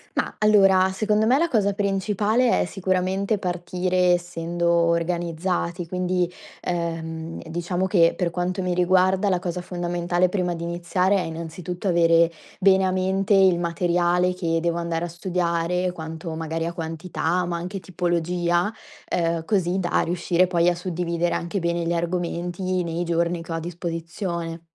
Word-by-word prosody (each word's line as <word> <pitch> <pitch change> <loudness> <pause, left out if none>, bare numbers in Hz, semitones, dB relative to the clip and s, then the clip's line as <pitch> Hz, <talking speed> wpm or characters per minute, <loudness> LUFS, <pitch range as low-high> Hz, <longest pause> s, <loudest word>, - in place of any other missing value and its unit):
Ma, - - -1
allora, 195 -3 +5
secondo 215 +2 +1
me 255 - +5
la 335 +3 +2
cosa 205 -8 +1
principale 205 +4 +1
è - - +1
sicuramente 190 +3 0
partire 180 0 0
essendo 175 -1 -2
organizzati, 170 +1 0
quindi, 180 0 0 0.3
ehm, 165 -1 -4
diciamo 175 +3 -2
che, 175 -4 +4
per 175 -2 0
quanto 180 +2 -2
mi 180 -1 0
riguarda, 185 +2 +3
la 185 - +2
cosa 180 0 -3
fondamentale, 175 0 0
prima 180 -2 -1
di 165 - -6
iniziare, 175 +3 +1
è - - +1
innanzitutto 170 +3 -5
avere 170 -1 +4 0.3
bene 190 -1 +5
a 185 - +1
mente 190 +2 +1
il 190 -3 +5
materiale 175 +1 +1
che 165 -3 -1
devo 170 0 0
andare 170 0 -2
a - - -4
studiare, 175 0 -1
quanto 160 0 -6
magari 165 0 -3
a 170 - -3
quantità, 165 +1 -2
ma 170 0 -2
anche 180 +3 -5
tipologia, 175 +1 0 0.3
ehm, 165 -1 -1
così 185 -1 +1
da 175 -2 +1
riuscire 175 +1 +1
poi, 175 -1 +3
a 175 - 0
suddividere 175 -1 -1
anche 170 +4 -2
bene 170 -1 -1
gli 170 - 0
argomenti, 175 +1 -2
nei 170 0 -2
giorni 170 0 0
che 165 - -9
ho - - -1
a - - -2
disposizione. 170 0 -4
175 Hz, 155 wpm, -24 LUFS, 170-185 Hz, 0.3 s, allora